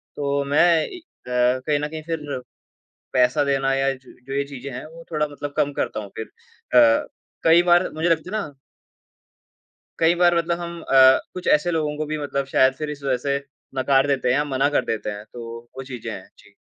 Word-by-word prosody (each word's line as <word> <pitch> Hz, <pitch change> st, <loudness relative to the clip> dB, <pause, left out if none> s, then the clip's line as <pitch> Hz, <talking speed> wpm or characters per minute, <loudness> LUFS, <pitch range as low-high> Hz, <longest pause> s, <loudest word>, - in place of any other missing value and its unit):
तो 140 Hz, -1 st, -1 dB
मैं 150 Hz, -, +6 dB, 0.2 s
ए 370 Hz, -, -8 dB
अ, 325 Hz, -, -18 dB, 0.4 s
कहीं 150 Hz, -1 st, +2 dB
न 150 Hz, -, -2 dB
कहीं 155 Hz, +1 st, -7 dB
फिर 150 Hz, -5 st, -4 dB, 0.7 s
पैसा 125 Hz, +2 st, +3 dB
देना 135 Hz, -1 st, +1 dB
या 135 Hz, 0 st, +1 dB
जो 130 Hz, -1 st, -16 dB
जो 135 Hz, -, -7 dB
ये 140 Hz, +1 st, 0 dB
चीज़ें 140 Hz, -1 st, -8 dB
हैं, 125 Hz, -, -6 dB
वो 165 Hz, +1 st, -13 dB
थोड़ा 150 Hz, -1 st, +1 dB
मतलब 145 Hz, 0 st, -7 dB
कम 145 Hz, -, +1 dB
करता 110 Hz, -, -2 dB
हूँ 100 Hz, -2 st, -9 dB
फिर। 110 Hz, -, -6 dB, 0.5 s
अ, 115 Hz, -1 st, +4 dB, 0.4 s
कई 165 Hz, +1 st, +6 dB
बार 175 Hz, +1 st, +4 dB
मुझे 160 Hz, +3 st, -1 dB
लगता 165 Hz, +1 st, 0 dB
है -, -, 0 dB
ना 150 Hz, -, -6 dB, 1.5 s
कई 165 Hz, +1 st, +4 dB
बार 175 Hz, 0 st, +4 dB
मतलब 170 Hz, 0 st, 0 dB
हम 170 Hz, 0 st, -6 dB
अ, 130 Hz, -2 st, +6 dB
कुछ 180 Hz, 0 st, -6 dB
ऐसे 165 Hz, +4 st, -1 dB
लोगों 155 Hz, -3 st, -1 dB
को 155 Hz, -, -2 dB
भी 155 Hz, -, -1 dB
मतलब 140 Hz, -2 st, -2 dB
शायद 130 Hz, 0 st, +5 dB
फिर 150 Hz, +2 st, -4 dB
इस 145 Hz, -1 st, -7 dB
वजह 135 Hz, -2 st, +1 dB
से 140 Hz, 0 st, +2 dB, 0.4 s
नकार 135 Hz, +1 st, +3 dB
देते 135 Hz, -3 st, 0 dB
हैं 125 Hz, -, +3 dB
या 145 Hz, -, +2 dB
मना 135 Hz, 0 st, +1 dB
कर -, -, +2 dB
देते 110 Hz, -2 st, -2 dB
हैं, 105 Hz, 0 st, -7 dB
तो 115 Hz, -1 st, -7 dB, 0.2 s
वो 135 Hz, -, -5 dB
चीज़ें 125 Hz, -3 st, -7 dB
हैं। -, -, -9 dB
जी। -, -, -20 dB
140 Hz, 210 wpm, -23 LUFS, 130-160 Hz, 1.5 s, मैं